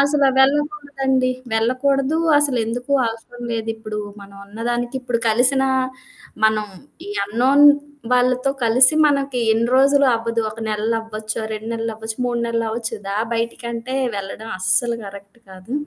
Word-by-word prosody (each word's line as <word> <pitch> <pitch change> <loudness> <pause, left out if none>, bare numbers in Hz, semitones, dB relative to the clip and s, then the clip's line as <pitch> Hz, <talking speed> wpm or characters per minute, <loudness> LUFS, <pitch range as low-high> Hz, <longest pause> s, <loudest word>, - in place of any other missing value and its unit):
అసల 285 0 +3
వెళ్ళకూడదండి. 275 -2 +1 0.2
వెళ్ళకూడదు. 265 +5 +1 0.2
అసలెందుకు 245 -2 -1
అవసరం 230 +2 -7
లేదిప్పుడు. 220 -1 -4 0.2
మనం 200 0 -13
ఉన్నదానికిప్పుడు 240 +3 -3
కలిసినా 265 +4 +2 0.8
మనం 215 -1 +3 0.6
అన్‌నోన్ 255 +8 +3 0.5
వాళ్ళతో 255 +1 +2
కలిసి 255 +5 +5
మనకి 275 -3 0
ఎన్ని 230 +1 +1
రోజులు 280 +1 +5
అవ్వదు. 230 0 -2
ఒక 220 +2 -10
నెల్లవ్వచ్చు, 215 0 -3
2 220 +1 -5
నెల్లవ్వచ్చు, 225 -1 -5
3 240 -1 -1
నెలలవ్వచ్చు. 230 0 -2
"దా 200 - -2 0.2
బయటికంటే", 235 +2 -4 0.2
వెళ్ళడం 200 +3 -6
అస్సలు 235 +6 +1
కరెక్ట్ 200 +2 -11
కాదు. 185 +5 -11
235 Hz, 110 wpm, -20 LUFS, 220-265 Hz, 0.8 s, కలిసి